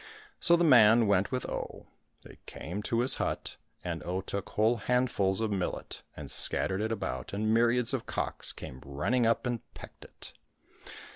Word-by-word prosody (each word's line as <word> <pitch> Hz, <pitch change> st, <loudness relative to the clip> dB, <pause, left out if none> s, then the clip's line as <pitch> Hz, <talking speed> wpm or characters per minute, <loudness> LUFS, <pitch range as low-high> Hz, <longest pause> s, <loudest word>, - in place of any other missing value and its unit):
So 170 Hz, -, +5 dB
the 170 Hz, -, +2 dB
man 115 Hz, -6 st, +6 dB
went 100 Hz, -1 st, +1 dB
with 130 Hz, -1 st, -2 dB
Oh. -, -, -6 dB, 0.4 s
They -, -, -15 dB
came 90 Hz, +6 st, -6 dB
to 115 Hz, +2 st, 0 dB
his 130 Hz, -, +6 dB
hut, -, -, -3 dB, 0.3 s
and 85 Hz, -3 st, -4 dB
Oh 90 Hz, +3 st, -3 dB
took 100 Hz, +1 st, -5 dB
whole 110 Hz, +3 st, +2 dB
handfuls 110 Hz, -4 st, 0 dB
of 110 Hz, -1 st, -1 dB
millet 95 Hz, -3 st, -4 dB, 0.2 s
and 75 Hz, -2 st, -3 dB
scattered 95 Hz, +2 st, +3 dB
it 110 Hz, +1 st, -2 dB
about, 115 Hz, -, -4 dB
and 110 Hz, +2 st, 0 dB
myriads 120 Hz, +1 st, +2 dB
of -, -, -3 dB
cocks -, -, -1 dB
came 65 Hz, 0 st, -10 dB
running 75 Hz, -, 0 dB
up 115 Hz, -, +1 dB
and 120 Hz, -1 st, -1 dB, 0.2 s
pecked -, -, -12 dB
it. -, -, -8 dB
110 Hz, 170 wpm, -29 LUFS, 95-120 Hz, 0.4 s, man